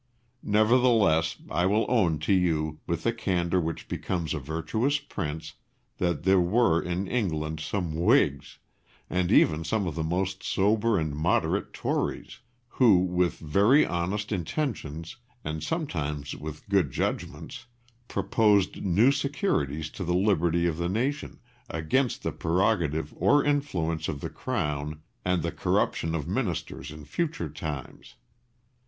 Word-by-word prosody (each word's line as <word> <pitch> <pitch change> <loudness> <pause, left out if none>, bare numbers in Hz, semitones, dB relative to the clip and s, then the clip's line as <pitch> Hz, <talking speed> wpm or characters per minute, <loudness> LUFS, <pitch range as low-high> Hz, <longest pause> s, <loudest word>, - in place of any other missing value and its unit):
Nevertheless 110 -7 +3 0.2
I 90 +3 +2
will 105 +3 +2
own 95 -11 +2
to 80 - +2
you, 80 -4 +1
with 85 -1 -2
the 115 - +1
candour 90 -5 0
which 80 0 -4
becomes 85 -4 -2
a 75 - -2
virtuous 80 - -1
prince, 80 - -5 0.5
that 85 -3 0
there 95 +1 +5
were 90 -1 +3
in 90 +2 -2
England 80 -9 -1
some 90 -6 -2
Whigs, 75 -3 +2 0.5
and 90 -1 +1
even 80 +1 +4
some 100 +5 0
of 85 - -2
the 80 - -3
most 95 +3 -1
sober 105 +2 +2
and 80 -3 -1
moderate 80 +4 0
Tories, - - -3 0.3
who, 120 -5 +5
with 90 -1 +1
very 100 - +4
honest 95 +5 -2
intentions, 90 - -3 0.3
and 75 0 -4
sometimes 75 - -3
with 75 0 -8
good 95 -7 +2
judgments, 65 - -4 0.4
proposed 105 -7 +2
new 100 +8 +4
securities 135 - -1
to 95 - -6
the 90 0 0
liberty 85 -3 +2
of 85 -2 0
the 85 0 -1
nation, 130 +9 -2 0.3
against 115 - 0
the 80 - -1
prerogative 80 -2 0
or 120 +11 +4
influence 90 - 0
of 70 - -3
the - - -5
Crown 75 +1 -3 0.2
and 90 -3 +1
the - - -1
corruption 80 0 0
of 75 -4 -3
Ministers - - -3
in 75 0 -10
future 150 - -2
times. 75 -2 -7
90 Hz, 135 wpm, -27 LUFS, 80-105 Hz, 0.5 s, there